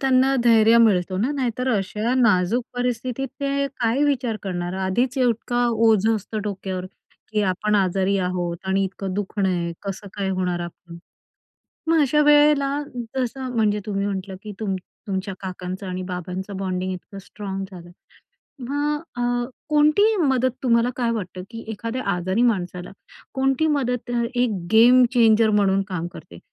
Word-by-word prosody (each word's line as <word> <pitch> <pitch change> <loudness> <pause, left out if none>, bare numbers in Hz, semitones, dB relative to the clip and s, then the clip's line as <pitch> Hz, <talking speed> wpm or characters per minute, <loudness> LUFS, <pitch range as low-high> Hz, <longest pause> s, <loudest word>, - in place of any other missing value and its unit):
त्यांना 265 0 +3
धैर्य 225 0 +6
मिळतो 190 -5 +3
ना, 245 +7 +1
नाहीतर 250 -1 -1
अशा 210 +5 -1
नाजूक 230 -1 +3
परिस्थितीत 250 +1 -2
ते 280 0 0
काय 235 +5 +2
विचार 255 -6 0
करणार! 175 -2 -3
आधीच 245 +7 0
इतका 240 0 +1 0.2
ओझं 220 +1 +4
असतं 215 +1 -4
डोक्यावर 190 -2 -4 0.5
की 210 -1 +1
आपण 205 +3 0
आजारी 195 0 +2
आहोत 180 -2 -2
आणि 195 +1 +2
इतकं 190 0 -5
दुखणं 200 -1 -1
आहे. 170 -2 -1
कसं 200 0 -6
काय 200 -2 -2
होणार 180 -2 -1
आपलं? 170 0 -9 0.9
मग 325 -1 +4
अशा 300 +2 +3
वेळेला 295 -1 +5 0.5
जसं 255 0 -3
म्हणजे 210 -2 +2
तुम्ही 200 -1 -1
म्हटलं 190 -1 -4
की 210 - -6
तुम 200 -3 -1 0.3
तुमच्या 190 0 -3
काकांचं 185 +1 -6
आणि 185 0 -4
बाबांचं 185 +2 -5
बॉन्डिंग 185 -1 -2
इतकं 195 +2 -8
स्ट्राँग 195 0 -6
झालं. 175 -1 -11 0.7
मग 290 +4 -1 0.2
अ, - - -2 0.5
कोणती 305 +9 +4
मदत 260 -2 +2
तुम्हाला 235 0 +3
काय 235 -2 0
वाटतं 185 -4 -4
की 230 0 -7
एखाद्या 230 +4 -4
आजारी 185 +5 -1
माणसाला 180 -6 0 0.4
कोणती 270 +3 +1
मदत 250 -5 -1
अ, 235 -1 +1
एक 245 -1 +2 0.2
गेम 245 +3 +7
चेंजर 225 -2 +5
म्हणून 195 -2 +3
काम 175 -3 -3
करते 85 0 -12
215 Hz, 150 wpm, -23 LUFS, 190-250 Hz, 0.9 s, गेम